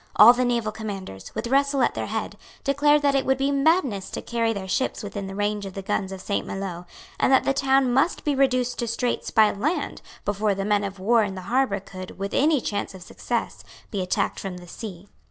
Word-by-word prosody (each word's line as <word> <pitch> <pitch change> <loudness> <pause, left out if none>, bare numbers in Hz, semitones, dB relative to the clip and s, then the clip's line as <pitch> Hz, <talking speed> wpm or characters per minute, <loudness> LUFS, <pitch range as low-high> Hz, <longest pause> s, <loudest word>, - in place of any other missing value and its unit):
All 230 +3 +10
the 250 +1 0
naval 235 -3 0
commanders, 195 - -7
with 220 +1 -3
Russell 275 +1 +2
at - - +2
their - - -3
head, - - -3 0.3
declared 290 +2 +3
that 285 -1 +3
it 275 - +2
would 265 0 +2
be 275 +1 +1
madness 275 - +2
to - - -5
carry 230 -1 0
their 200 -3 -4
ships 240 +5 -1
within 200 -1 -5
the 195 - -7
range 205 0 -1
of 195 -1 -7
the 195 - -5
guns 195 0 -1
of 190 -1 -7
Saint 200 - -2
Maloes, 185 -3 -5 0.3
and - - +3
that 265 - +5
the 275 - +1
town 270 -2 +3
must 275 +7 +2
be 295 - +1
reduced 255 -2 +1
to 240 - -1
straits 235 +2 -1
by 215 -2 +5
land 285 - -2 0.2
before 205 0 +1
the 195 0 -3
men 205 0 +2
of 200 0 -4
war 225 +5 +3
in 200 -2 -2
the 185 - -6
harbour 240 0 +1
could, 185 -1 -10
with 195 0 -4
any 300 +1 +3
chance 205 -4 -3
of 185 - -10
success, - - -4 0.3
be 200 - -2
attacked 185 +2 -1
from 190 -2 -5
the 175 0 -12
sea. 190 -1 -8
220 Hz, 225 wpm, -24 LUFS, 195-265 Hz, 0.3 s, All